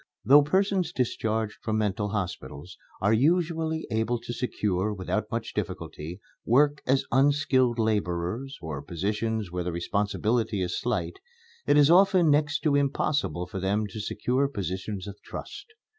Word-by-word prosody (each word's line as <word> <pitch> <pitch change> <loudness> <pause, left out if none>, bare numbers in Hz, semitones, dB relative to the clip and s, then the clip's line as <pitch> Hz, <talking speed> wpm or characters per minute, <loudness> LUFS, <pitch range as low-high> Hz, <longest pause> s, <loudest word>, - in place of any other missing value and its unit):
Though 140 +6 +8
persons 185 +2 +1
discharged 110 -5 -1
from 110 -1 -1
mental 105 -1 -1
hospitals 90 -4 -5 0.3
are 100 +3 +3
usually 160 +4 +1
able 110 +2 0
to 120 - -5
secure, 105 -5 -1
without 105 +2 -2
much 115 0 -3
difficulty, 85 +5 -5 0.2
work 145 +4 +3
as 135 +1 +2
unskilled 130 -2 +3
laborers, 110 +4 -1
or 75 -3 -4
positions 105 +4 -2
where 90 0 -2
the 90 - -1
responsibility 105 +4 0
is 90 0 -2
slight, 125 - -2 0.5
it - - +5
is 145 +1 +6
often 185 -3 +5
next 150 +1 +2
to 150 - +2
impossible 140 - 0
for 95 - -6
them 100 +3 0
to 105 - -7
secure 125 +6 0
positions 95 - -4
of 100 0 -9
trust. - - -8
110 Hz, 145 wpm, -27 LUFS, 100-145 Hz, 0.5 s, Though